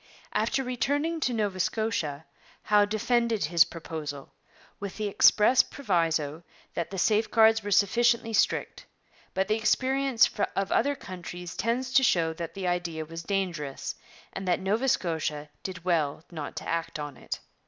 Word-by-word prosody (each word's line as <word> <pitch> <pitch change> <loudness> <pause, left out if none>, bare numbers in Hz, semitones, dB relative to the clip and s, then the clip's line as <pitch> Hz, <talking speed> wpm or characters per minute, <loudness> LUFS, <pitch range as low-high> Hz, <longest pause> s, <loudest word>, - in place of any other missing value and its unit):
After 270 - +1
returning 285 +7 -1
to 255 - 0
Nova 205 -5 -1
Scotia 170 -8 -1 0.4
Howe 210 -1 +4
defended 230 +1 +1
his 165 +1 +5
proposal, 155 -4 -7 0.5
with 200 -2 -6
the 215 -1 -1
express 210 +4 +5
proviso 165 - -1 0.3
that 170 - -3
the 195 - -6
safeguards 220 +2 +4
were 205 - -5
sufficiently 230 +3 +3
strict; 215 - 0 0.5
but 190 0 +1
the 215 - +2
experience 260 +2 +3 0.3
of 195 0 -1
other 285 0 +2
countries 180 -6 -8
tends 250 +3 -1
to 265 - +6
show 165 -8 +2
that 165 0 -6
the 195 -1 -4
idea 175 -3 -2
was 165 +1 -7
dangerous, 170 -7 -3 0.4
and 190 -1 -5
that 180 - +2
Nova 215 +7 0
Scotia 155 - -1
did 180 -3 -7
well 155 -4 0
not 155 -4 -6
to - - -6
act 165 -1 -2
on 145 -2 -6
it. - - -6
195 Hz, 150 wpm, -28 LUFS, 165-230 Hz, 0.5 s, to